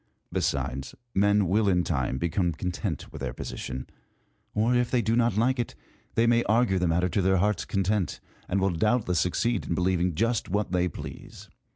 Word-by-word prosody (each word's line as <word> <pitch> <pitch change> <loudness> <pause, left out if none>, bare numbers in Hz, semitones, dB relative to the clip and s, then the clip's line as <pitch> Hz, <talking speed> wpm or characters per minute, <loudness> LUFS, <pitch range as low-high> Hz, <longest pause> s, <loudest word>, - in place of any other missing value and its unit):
Besides, 65 +2 -1 0.2
men 100 0 +3
will 100 +3 +3
in 90 -2 +3
time 65 -6 -1
become 85 +2 0
content 90 0 -4
with - - -8
their - - -3
position; 65 0 -5 0.7
or, 115 +4 +2
if 125 -1 +2
they 125 -2 +1
do 110 +3 +1
not 120 -3 +2
like 125 +3 +2
it, 120 - -2 0.4
they 115 - +4
may 120 0 +4
argue 110 -3 +3
the 90 - +1
matter 85 +2 +2
to 95 - +1
their 95 +1 +3
hearts' 105 +1 +1
content, 100 0 0 0.3
and 100 - +1
will 95 0 +2
doubt 110 +7 +1
less 90 -1 +2
succeed 115 +4 0
in 85 - 0
believing 90 -1 +1
just 115 +6 0
what 100 0 -1
they 90 -1 +2
please. - - -9
95 Hz, 190 wpm, -27 LUFS, 90-110 Hz, 0.7 s, they